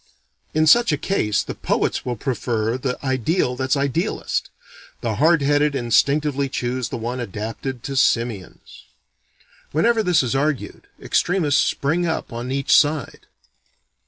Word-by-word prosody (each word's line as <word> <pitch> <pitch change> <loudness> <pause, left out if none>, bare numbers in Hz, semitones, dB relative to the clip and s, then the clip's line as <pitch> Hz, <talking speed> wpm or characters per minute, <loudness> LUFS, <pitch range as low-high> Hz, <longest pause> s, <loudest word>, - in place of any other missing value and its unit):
In 155 0 +3
such 235 +8 +5
a 150 - +1
case, 125 - 0
the - - -6
poets - - -1
will 125 - -3
prefer 115 -2 -2
the 125 0 -3
ideal 130 - 0
that's 130 +2 0
idealest: 140 - -1 0.5
the - - -2
hard 160 -1 +4
headed 145 +1 +2
instinctively 140 +3 +1
choose 125 -1 -2
the - - -4
one 120 +2 -4
adapted 115 +3 -5
to 135 - -5
simians. 115 -7 -1 0.9
Whenever 225 +9 +2
this 180 -8 +3
is 125 - -1
argued, 140 0 -2
extremists 170 -6 +1
spring 165 +5 0
up 160 -6 -3
on 120 +2 -5
each 135 0 +2
side. 145 -2 +1
135 Hz, 135 wpm, -21 LUFS, 120-155 Hz, 0.9 s, such